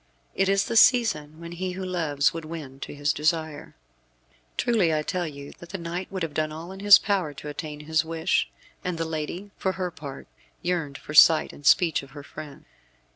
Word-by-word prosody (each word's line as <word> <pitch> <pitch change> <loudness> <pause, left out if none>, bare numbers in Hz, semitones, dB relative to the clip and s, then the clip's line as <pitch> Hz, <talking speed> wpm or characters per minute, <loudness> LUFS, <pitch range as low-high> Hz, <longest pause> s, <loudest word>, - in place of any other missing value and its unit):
It 195 0 +1
is 195 0 +3
the - - -3
season 165 - +4
when 170 0 -8
he 180 +1 -4
who 190 +1 -5
loves 160 -6 +1
would 165 -1 -5
win 155 -4 -8
to - - -7
his 145 0 0
desire. 155 0 -1 0.8
Truly 215 -9 +2
I 155 -1 0
tell 180 +1 -2
you 140 -2 -9
that 170 - -12
the 195 - -4
knight 175 +2 -5
would 190 -3 -3
have 160 -3 -3
done 155 +1 -1
all 165 +4 -8
in 190 - -9
his 205 0 +9
power 185 -8 -1
to 150 - -8
attain 150 0 -6
his 160 +1 +1
wish, 165 +2 0 0.3
and 180 -2 -2
the 165 - -1
lady, 165 +5 -5
for 190 - -1
her 180 0 -3
part, 140 -4 -9 0.4
yearned 165 -6 -2
for 150 - -9
sight 160 +1 +7
and 145 - -6
speech 165 -4 +4
of 140 -1 -14
her 145 - -8
friend. 145 0 -10
165 Hz, 205 wpm, -26 LUFS, 150-185 Hz, 0.8 s, his